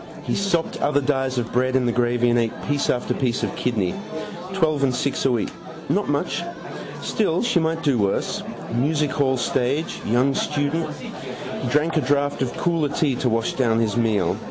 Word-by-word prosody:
He - - -2
sopped 195 -5 0
other 145 0 +3
dies 135 -2 0
of 120 -2 -2
bread 130 +1 +2
in 130 -1 +3
the 120 - +2
gravy 120 0 +2
and 120 - +4
ate 115 -1 -1
piece 145 -1 +1
after 125 - +1
piece 125 -3 0
of - - -1
kidney. 105 -8 0 0.6
Twelve 160 -6 +1
and 130 -2 +2
six 140 +1 -1
a 135 - +4
week. 115 -4 0 0.4
Not - - +1
much. - - 0 0.6
Still, 165 +6 +1
she 240 -7 +3
might 165 0 0
do 140 -6 +2
worse. 100 -1 0 0.3
Music 150 +5 +1
hall 130 -3 +2
stage. 130 +5 0
Young 125 +5 +2
student. 150 +3 0
He - - -7
drank 155 +3 +2
a - - +4
draught 145 +1 +1
of 130 -2 0
cooler 165 -4 +1
tea 145 -2 +1
to 125 - +1
wash 115 0 0
down 115 -4 +2
his 110 -3 +1
meal. 105 -7 +2
130 Hz, 185 wpm, -23 LUFS, 120-150 Hz, 0.6 s, and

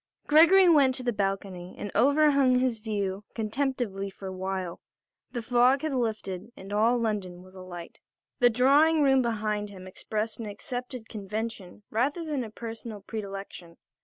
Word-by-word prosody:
Gregory 340 +5 +7
went 280 -6 +5
to 255 - 0
the 240 -1 0
balcony 195 -3 -3
and 205 - -5
overhung 280 0 +4
his 250 -3 0
view 205 -3 -3
contemplatively 220 -4 -2
for 195 0 -12
a 190 - -5
while. 185 -2 -4 0.5
The 240 -2 -4
fog 250 +4 +3
had 310 -2 -1
lifted, 220 -5 -3
and 195 +2 -8
all 225 +4 +3
London 200 -6 -3
was 185 0 -16
alight. 185 -2 -9 0.4
The 245 - +6
drawing 290 +6 +4
room 270 -1 +5
behind 215 -3 -1
him 190 -2 -11
expressed 215 +4 -4
an 225 - -5
accepted 245 +2 -6
convention 210 -1 -6
rather 280 +9 0
than 295 -5 -2
a 225 - -7
personal 225 -1 -7
predilection. 195 -5 -7
220 Hz, 155 wpm, -28 LUFS, 195-255 Hz, 0.5 s, Gregory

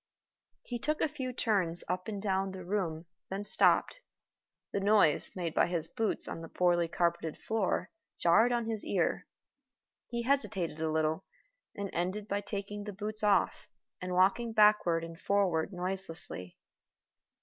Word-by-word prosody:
He 240 -1 -5
took 305 +5 -1
a - - +2
few 270 -4 -5
turns 195 -8 0
up 180 +1 -2
and 210 -2 -4
down 195 -1 -1
the 185 -2 -8
room, 175 -4 -2 0.2
then 195 +2 -4
stopped. - - +3 0.7
The - - -1
noise 200 -6 +3
made 170 -4 -3
by - - +3
his 170 -3 -1
boots 225 -4 -1
on 165 - -5
the 165 - -8
poorly 175 -1 +2
carpeted 170 -1 -1
floor 220 -4 -1 0.3
jarred 225 +8 +4
on 240 -1 0
his 220 -2 -3
ear. - - 0 0.8
He 235 0 -3
hesitated 220 - 0
a 160 - 0
little, 155 0 0 0.5
and 200 -1 -4
ended 185 +5 -2
by 205 0 -1
taking 205 0 -5
the 210 - -5
boots 215 +3 -4
off, 205 -2 +2 0.3
and 180 0 -3
walking 200 +5 +3
backward 210 -6 +4
and 165 0 -9
forward 190 -4 +1
noiselessly. 180 - 0
195 Hz, 150 wpm, -31 LUFS, 170-215 Hz, 0.8 s, jarred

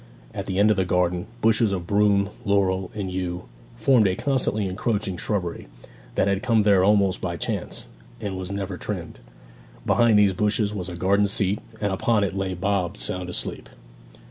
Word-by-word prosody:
At - - -5
the 95 -1 -2
end 105 +2 +5
of 105 - +1
the 95 - +2
garden, 90 -1 0
bushes 110 -1 +4
of 90 -3 -3
broom, 100 0 +2
laurel, 95 -2 +1
and 100 -3 -3
yew 90 -1 -3 0.3
formed 115 -2 +4
a 95 - 0
constantly 125 -6 0
encroaching 100 0 -1
shrubbery, 90 -2 -3 0.5
that - - +2
had 100 0 +1
come 115 -3 +3
there 100 -3 +4
almost 100 -2 +3
by 85 -2 -3
chance, - - -3 0.3
and 100 -4 -4
was 95 0 -5
never 100 -2 -4
trimmed. - - -5 0.7
Behind 115 -3 +4
these 100 -2 +4
bushes 105 +2 0
was 95 -3 -4
a 90 - -6
garden 100 +3 +2
seat, 100 0 +1 0.2
and 100 -2 -1
upon 105 +2 +2
it 100 -1 -2
lay 95 -1 -2
Bob 95 0 -1
sound 90 -1 -4
asleep. 90 - -3
100 Hz, 175 wpm, -24 LUFS, 95-105 Hz, 0.7 s, end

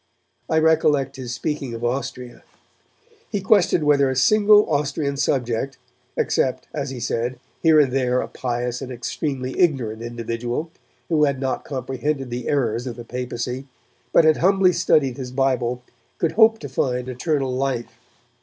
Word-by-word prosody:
I 160 - +2
recollect 150 -4 +2
his 125 -2 -6
speaking 135 -2 -3
of 115 - -7
Austria. 125 -1 -4 0.9
He 205 - 0
questioned 190 -4 +3
whether 140 -2 +4
a 130 - -1
single 210 +9 +5
Austrian 145 -1 -1
subject, 135 -1 -1 0.4
except, 130 - 0
as 140 -2 -3
he 130 -2 -6
said, 120 +1 -2 0.2
here 160 -2 +6
and 140 -4 +3
there 125 -2 +1
a - - -2
pious 125 0 -3
and 130 -1 -6
extremely 130 +1 -4
ignorant 125 -11 +1
individual, 120 +5 -4 0.4
who 155 -3 +3
had 140 -2 -1
not 130 -1 -2
comprehended 135 0 -3
the 120 0 -4
errors 120 -3 0
of 120 - -5
the 120 - -9
Papacy, 125 +2 -4 0.4
but 165 - +5
had 155 -1 +5
humbly 190 0 +4
studied 135 -6 +2
his 130 -2 -5
Bible, 125 -2 0 0.3
could 165 - 0
hope 225 0 +5
to 145 - -5
find 125 -1 -1
eternal 135 +1 -1
life. 130 -2 -3
135 Hz, 155 wpm, -22 LUFS, 125-150 Hz, 0.9 s, here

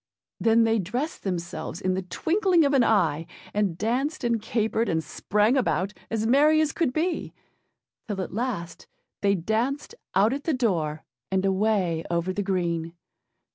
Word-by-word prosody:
Then 230 0 +4
they 225 0 +2
dressed 245 - -3
themselves 175 -2 -4
in 185 -2 0
the 190 - -1
twinkling 340 - +2
of 280 - +2
an 265 -3 +5
eye, 165 -8 +2 0.3
and 200 -5 0
danced 250 - -1
and 235 -2 +1
capered 225 +1 0
and 160 -1 0
sprang 210 - +1
about, 195 - +1 0.2
as 220 -1 -1
merry 295 +6 +5
as 310 -2 +2
could 325 -5 0
be; 325 +4 -2 0.7
till 205 -3 -3
at - - -8
last 205 -7 -4 0.3
they 200 0 +3
danced 225 - -1 0.2
out 205 +6 +4
at 285 +1 -5
the 320 - +1
door, 165 -11 0 0.3
and 190 0 +1
away 190 -4 +1
over 170 +2 0
the 205 - -1
green. 170 -4 -1
210 Hz, 160 wpm, -26 LUFS, 180-255 Hz, 0.7 s, an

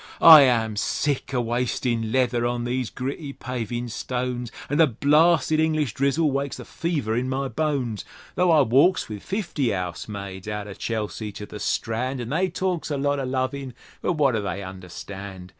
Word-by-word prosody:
I 160 -3 +11
am 115 -5 +2
sick 140 +6 -1
o' 125 -2 +1
wastin' 120 -1 -1
leather 125 -2 +1
on 120 0 -1
these 125 -1 -2
gritty 140 +3 -5
pavin' 120 -2 -4
stones, 125 0 -3 0.2
An' 145 - -1
the 165 - +7
blasted 155 +4 +3
English 155 -6 +1
drizzle 140 +4 +1
wakes 140 0 -2
the - - -9
fever 145 -10 -2
in 125 +2 -1
my 135 +1 -1
bones; 130 -5 -2 0.3
Tho' 180 0 +2
I 160 -3 +6
walks 140 +9 +3
with 105 -2 -7
fifty 175 - -2
'ousemaids 95 +1 -5
outer 105 -1 -4
Chelsea 110 0 -4
to 105 +1 -7
the 105 - -9
Strand, 120 +5 -1
An' 120 -1 -5
they 180 +7 +1
talks 180 -2 -2
a 145 - -1
lot 145 +1 0
o' 135 - -2
lovin', 130 0 -2 0.3
but - - +1
wot 145 -5 +2
do 110 - 0
they 100 0 -4
understand? 95 0 -8
125 Hz, 175 wpm, -24 LUFS, 110-145 Hz, 0.3 s, I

